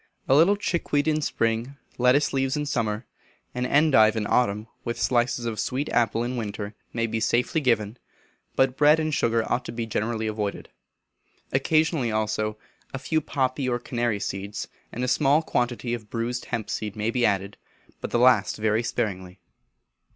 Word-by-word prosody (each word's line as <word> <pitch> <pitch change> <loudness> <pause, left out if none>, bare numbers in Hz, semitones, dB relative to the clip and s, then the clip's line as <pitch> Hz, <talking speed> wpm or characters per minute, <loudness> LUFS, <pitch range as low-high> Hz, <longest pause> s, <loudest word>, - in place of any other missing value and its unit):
A - - +4
little 165 +8 +6
chickweed 165 -7 -1
in 155 0 +2
spring, 115 +1 -1 0.2
lettuce 125 +4 +3
leaves 135 +1 0
in 150 - -1
summer, 115 -5 -1 0.5
and 125 0 -1
endive 135 -8 +5
in 110 -2 -1
autumn, 105 -2 +1 0.2
with 120 -2 -4
slices 120 0 +1
of 110 -3 -3
sweet 130 +7 -2
apple 115 -1 +1
in 125 +1 -3
winter, 105 -2 -4 0.2
may 115 0 -1
be 115 0 -2
safely 125 +8 +1
given; 115 -3 0 0.6
but 130 -1 +2
bread 150 +3 +5
and 155 -1 -1
sugar 115 -4 +2
ought 125 +1 0
to - - -5
be 115 -1 -3
generally 110 +1 -2
avoided. 105 -2 -3 0.8
Occasionally, 155 -2 +2
also, 110 0 -1 0.4
a - - -1
few 155 +4 0
poppy 130 -1 -1
or 120 - +1
canary 120 -3 -2
seeds, 100 +1 -4 0.2
and 125 - -4
a - - 0
small 140 +4 +3
quantity 120 -3 -1
of 110 -3 -6
bruised 120 +1 -3
hemp 115 -3 -3
seed 105 -2 -3
may 110 +1 -1
be 125 0 0
added, 100 -2 +1 0.4
but - - -5
the - - +1
last 120 -4 +4
very 110 +1 +1
sparingly. 95 -5 -3
120 Hz, 170 wpm, -25 LUFS, 110-135 Hz, 0.8 s, little